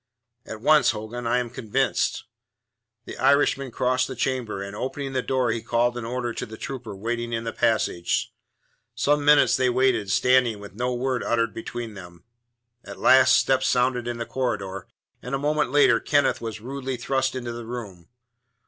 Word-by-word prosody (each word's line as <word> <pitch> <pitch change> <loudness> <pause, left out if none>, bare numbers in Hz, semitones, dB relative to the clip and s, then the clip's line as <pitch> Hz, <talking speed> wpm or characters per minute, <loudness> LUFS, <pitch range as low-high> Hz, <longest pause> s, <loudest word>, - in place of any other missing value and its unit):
"At 110 -1 -7
once, 155 +4 +5
Hogan. 115 +2 -4
I 120 +1 +2
am 120 -2 -2
convinced." 110 -4 -1 0.8
The - - -9
Irishman 140 0 +3
crossed 130 +1 0
the 130 - -6
chamber, 125 -4 -2
and 100 +1 -8
opening 135 +3 -4
the 130 - 0
door 130 -2 0
he 115 0 -2
called 120 +1 +1
an 120 -2 -5
order 120 0 -3
to - - -4
the 110 0 -10
trooper 120 -6 -6
waiting 120 +3 -3
in 115 0 -2
the 115 - -4
passage. 95 -6 0 0.6
Some 145 0 +1
minutes 145 0 +5
they 130 -1 +2
waited, 125 -5 +1
standing, 125 0 +3
with 100 -1 -11
no 125 +4 -2
word 125 0 -1
uttered 115 -2 0
between 115 0 -6
them. 90 -3 -12 0.6
At - - -10
last 130 - +6
steps 130 -1 +2
sounded 125 -1 +1
in 120 -1 -3
the 115 - -4
corridor, 100 -9 -3 0.3
and 125 +2 -3
a - - 0
moment 150 0 0
later 140 -4 +4
Kenneth 145 -1 +1
was 110 -2 -6
rudely 135 +1 -5
thrust 135 +2 -1
into 120 -2 -4
the 115 -1 -7
room. 105 -8 -8
120 Hz, 175 wpm, -24 LUFS, 115-130 Hz, 0.8 s, last